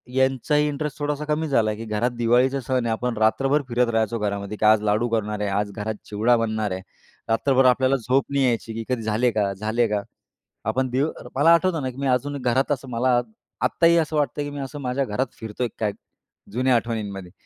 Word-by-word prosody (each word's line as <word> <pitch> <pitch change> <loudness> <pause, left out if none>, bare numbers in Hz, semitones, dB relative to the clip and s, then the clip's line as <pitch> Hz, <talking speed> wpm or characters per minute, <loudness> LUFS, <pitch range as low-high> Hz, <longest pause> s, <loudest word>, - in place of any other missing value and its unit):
यांचाही 135 +3 +2
इंटरेस्ट 150 0 -3
थोडासा 145 0 -2
कमी 155 +1 -1
झाला 115 -7 +2
आहे, 105 - -5
की 115 - -6
घरात 110 +3 0
दिवाळीचा 125 +4 +3
सण 125 -1 -1
आहे 115 - 0
आपण 125 0 -2
रात्रभर 135 +7 +2
फिरत 120 +1 +2
राहायचो 115 0 0
घरामध्ये, 100 0 -3
की 110 - 0
आज 110 0 +6
लाडू 105 +3 +1
करणार 105 -2 -1
आहे, 105 - 0
आज 100 +1 -1
घरात 110 +1 -4
चिवडा 110 +4 +2
बनणार 110 -3 -1
आहे. 95 - -3 0.5
रात्रभर 130 +3 +3
आपल्याला 130 +1 +4
झोप 130 +2 +1
नाही 140 -1 +2
यायची, 115 -2 -1
की 115 +1 -4
"कधी 125 -3 -1
झाले 110 +3 +1
का? 105 -3 0
झाले 110 +4 0
का?" 105 -1 -1 0.7
आपण 130 +3 0
दीव 135 +5 +1 0.3
मला 165 +5 +6
आठवतं 170 -1 +2
ना, 130 - -1
की 125 - -11
मी 140 0 -2
अजून 135 +3 0
घरात 130 +4 +1
असं 135 -2 -2
मला 120 +1 +2 0.4
आत्ताही 170 0 +4
असं 160 -1 0
वाटत 145 0 0
की 145 0 -2
मी 145 - -7
असं 140 +2 -6
माझ्या 130 +1 -1
घरात 125 +5 -1
फिरतोय 110 +2 -3
काय? 105 -2 0 0.6
जुन्या 125 +3 +2
आठवणींमध्ये 105 -6 -3
120 Hz, 205 wpm, -23 LUFS, 110-135 Hz, 0.7 s, आज